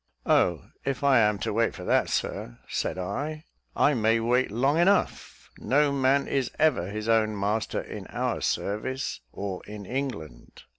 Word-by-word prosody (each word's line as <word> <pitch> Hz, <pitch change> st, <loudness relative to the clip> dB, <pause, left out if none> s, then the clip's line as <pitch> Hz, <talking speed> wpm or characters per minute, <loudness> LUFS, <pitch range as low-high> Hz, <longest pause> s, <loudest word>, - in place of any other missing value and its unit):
"Oh, 85 Hz, -5 st, +2 dB, 0.2 s
if 135 Hz, 0 st, -2 dB
I 140 Hz, -3 st, +5 dB
am 105 Hz, -2 st, +3 dB
to -, -, -1 dB
wait 115 Hz, +1 st, +1 dB
for -, -, -8 dB
that, -, -, +2 dB
Sir," -, -, -3 dB
said -, -, -2 dB
I, 145 Hz, -, -4 dB, 0.3 s
"I 150 Hz, -, +4 dB
may 115 Hz, -2 st, +2 dB
wait 125 Hz, +3 st, +2 dB
long 135 Hz, +9 st, +1 dB
enough; 195 Hz, +4 st, +1 dB
no 145 Hz, +2 st, +2 dB
man 140 Hz, 0 st, +2 dB
is 135 Hz, -3 st, 0 dB
ever 150 Hz, -, +2 dB
his 105 Hz, +1 st, -5 dB
own 110 Hz, -2 st, +2 dB
master 105 Hz, +2 st, -1 dB
in -, -, -8 dB
our -, -, -2 dB
service, 130 Hz, +7 st, -2 dB
or 95 Hz, -2 st, -5 dB
in 105 Hz, -1 st, -8 dB
England. 125 Hz, -, -5 dB
115 Hz, 160 wpm, -27 LUFS, 105-140 Hz, 0.3 s, I